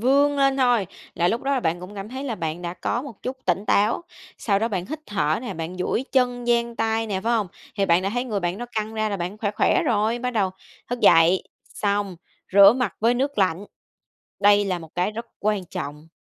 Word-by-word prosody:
vươn 280 +4 +3
lên 275 -1 +3
thôi, 245 -6 +3 0.3
là 175 +1 +2
lúc 230 - -1
đó 275 - -1
là 260 - 0
bạn 165 -1 -1
cũng 180 +3 -9
cảm 195 0 -6
thấy 260 +4 -6
là 245 - -2
bạn 165 -2 -4
đã 175 0 -4
có 235 +7 -2
một 265 -7 -11
chút 255 +1 -4
tỉnh 185 +3 0
táo. 210 +9 +2 0.4
Sau 200 -3 +1
đó 225 +3 0
bạn 185 -5 -3
hít 310 +2 -5
thở 160 -7 0
nè, 200 -6 -5
bạn 165 +2 -5
duỗi 185 +7 -1
chân, 245 -2 +1
dang 235 -1 +1
tay 225 0 0
nè, 195 -3 -2
phải 230 +4 0
hông? 215 -5 +1 0.3
Thì 200 -1 +1
bạn 170 0 +4
đã 195 - -1
thấy 245 +2 -1
người 210 -5 -2
bạn 175 +2 -2
nó 240 - -5
căng 215 0 -3
ra 215 0 0
là 200 - -2
bạn 180 +3 -5
khỏe 210 -2 -1
khỏe 290 - +2
rồi. 230 -4 +1
Bắt 250 +1 -2
đầu 205 -6 +1 0.4
thức 245 0 -3
dậy, 165 +3 +6 0.2
xong 200 -2 -2 0.4
rửa 200 +1 +9
mặt 245 -6 -1
với 230 +3 +3
nước 270 0 -1
lạnh, 185 -1 +1 0.8
đây 205 0 +5
là 185 -3 -1
một 160 -2 -13
cái 180 +4 0
rất 230 +2 -6
quan 210 -2 0
trọng. 150 -1 -7
210 Hz, 235 wpm, -24 LUFS, 185-240 Hz, 0.8 s, rửa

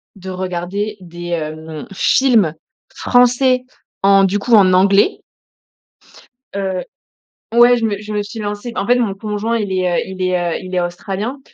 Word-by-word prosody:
de 190 -1 -9
regarder 185 +3 -4
des, 175 0 -9
hem, 155 -1 -5
films 215 - +3 0.4
français 250 0 +3 0.4
en, 195 0 +5
du 195 +2 +1
coup, 230 +4 -1
en 190 -4 +6
anglais 195 - +3 1.3
heu 190 -2 -2 0.7
ouais, 240 +1 +6
je 230 - -1
me 205 -2 -1
je 210 0 -7
me 210 0 -1
suis 220 +2 -8
lancée 210 +3 -4
en 200 - -2
fait 245 - +4
mon 230 -5 0
conjoint, 210 +3 -2
il 205 -3 -3
est, 185 -2 0
heu - - -1
il 190 0 -7
est, 175 -2 0
heu - - -8
il 185 0 -9
est 180 - +2
australien, 195 +8 -4
195 Hz, 165 wpm, -17 LUFS, 185-225 Hz, 1.3 s, en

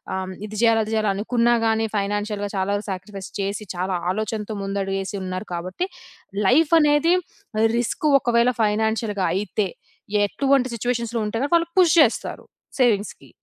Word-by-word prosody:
ఆహ్, 190 - -2
హ్మ్, 185 - -7
ఇది 215 0 -8
చేయాలి, 225 -1 +4
అది 220 - -5
చేయాలి 215 -2 +1
అనుకున్నా 235 +4 +1
గాని 225 0 +1
ఫైనాన్షియల్‌గా 205 0 -2
చాలా 190 +2 0
సాక్రిఫైస్ 195 0 -6
చేసి, 200 +2 -3
చాలా 185 +1 -1 0.2
ఆలోచనతో 215 +1 -3
ముందడుగేసి 195 0 -2
ఉన్నారు 185 +2 -5
కాబట్టి, 185 - -3 0.6
లైఫనేది 310 +2 +4 0.6
రిస్కు, 245 +6 0
ఒకవేళ 240 +1 +3
ఫైనాన్షియల్‌గా 215 -1 0
అయితే 200 +1 -1 0.6
ఎటువంటి 270 +2 +1
సిట్యుయేషన్‌లో 235 0 -2
ఉంటే 230 +6 -1
వాళ్ళు 335 0 +2
పుష్ 345 -2 +5
చేస్తారు 240 - -2 0.3
సేవింగ్స్‌కి. 215 -5 +1
215 Hz, 130 wpm, -23 LUFS, 200-240 Hz, 0.6 s, పుష్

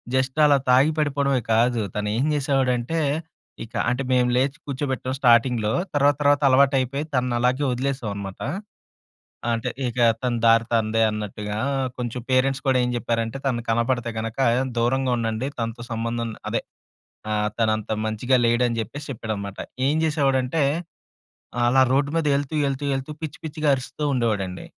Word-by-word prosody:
Just 130 +3 0
అలా 145 -1 +5
తాగి 130 +5 +5
పడిపోడమే 140 -3 +1
కాదు. 120 +1 +2
తను 105 0 -1
ఏం 130 - +1
చేసేవాడంటే, 135 0 0 0.7
ఇక 115 - -21 0.2
అంటే 125 +3 -1
మేము 125 -1 +3
లేచి 135 +3 +1
కూచోబెట్టాం 130 -2 -2
స్టాటింగ్‌లో. 120 -3 +3 0.2
తర్వాత 145 0 +4
తర్వాత 145 0 +4
అలవాటయిపోయి, 135 +1 +2
తనని 125 -2 +1
అలాగే 125 +3 +1
వదిలేసాం 130 -2 -2
అనమాట. 100 -1 -7 1.1
అంటే, 115 - -2 0.2
ఇక 120 +1 -4 0.2
తన 125 -2 0
దారి 115 0 +5
తనదే 115 0 +2
అన్నట్టుగా. 105 0 -4 0.4
కొంచెం 125 0 -4
పేరెంట్స్ 135 +1 +2
కూడా 130 - +4
ఏం 125 - 0
జెప్పేరంటే, 115 +1 -2
తను 120 -3 -1
కనపడితే 120 +1 0
గనక, 115 +3 -5 0.4
దూరంగా 130 +2 +1
ఉండండి. 115 +4 -2
తనతో 115 +1 -4
సంబంధం 115 0 -2 0.2
అదే. - - -1 0.7
ఆహ్, 105 0 +1
తనంత 110 -2 0 0.2
మంచిగా 120 +4 +1
లేడని 120 0 +2
జెప్పేసి 135 +7 -5
చెప్పేడనమాట. 105 -5 -5 0.3
ఏం 145 - +2
జేసేవాడంటే, 140 -2 +1 1.0
అలా 130 +2 +4
రోడ్డు 140 +2 +2
మీద 165 - +1
యెళ్తూ, 140 +1 -2
యెళ్తూ, 135 +1 -2
యెళ్తూ 135 +2 -4
పిచ్చి 155 -3 -5
పిచ్చిగా 155 -1 -2
అరుస్తూ 135 +3 -6
ఉండేవాడండి. 105 -7 -1
125 Hz, 140 wpm, -23 LUFS, 115-135 Hz, 1.1 s, అలా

